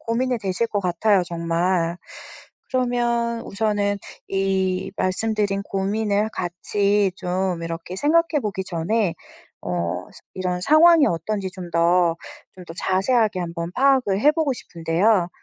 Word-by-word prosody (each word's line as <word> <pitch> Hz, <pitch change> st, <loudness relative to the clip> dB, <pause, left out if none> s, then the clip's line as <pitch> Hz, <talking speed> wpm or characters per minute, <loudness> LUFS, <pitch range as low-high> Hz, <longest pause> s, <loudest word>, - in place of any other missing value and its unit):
고민이 245 Hz, +2 st, -1 dB
되실 200 Hz, +2 st, -1 dB
것 205 Hz, -, -1 dB
같아요 190 Hz, +2 st, +2 dB
정말. 170 Hz, 0 st, -1 dB, 0.7 s
그러면 240 Hz, -2 st, 0 dB
우선은 205 Hz, -1 st, -1 dB, 0.3 s
이 190 Hz, -1 st, 0 dB
말씀드린 200 Hz, +1 st, 0 dB
고민을 205 Hz, +2 st, -1 dB
같이 200 Hz, +2 st, 0 dB
좀 180 Hz, -1 st, -2 dB
이렇게 165 Hz, +2 st, -6 dB
생각해 310 Hz, -, +2 dB
보기 195 Hz, -3 st, -3 dB
전에 185 Hz, +2 st, -1 dB, 0.5 s
어 85 Hz, 0 st, -2 dB
그 -, -, -19 dB, 0.2 s
이런 180 Hz, -1 st, -2 dB
상황이 315 Hz, -, +6 dB
어떤지 190 Hz, +4 st, -2 dB
좀 180 Hz, -2 st, -8 dB
더, 170 Hz, 0 st, +3 dB, 0.4 s
좀 185 Hz, -, -11 dB
더 165 Hz, -, -9 dB
자세하게 205 Hz, +3 st, +1 dB
한번 170 Hz, 0 st, -4 dB
파악을 255 Hz, -6 st, +2 dB
해 295 Hz, +6 st, +5 dB
보고 310 Hz, -3 st, 0 dB
싶은데요. 175 Hz, +1 st, +1 dB
195 Hz, 265 characters per minute, -22 LUFS, 175-225 Hz, 0.7 s, 상황이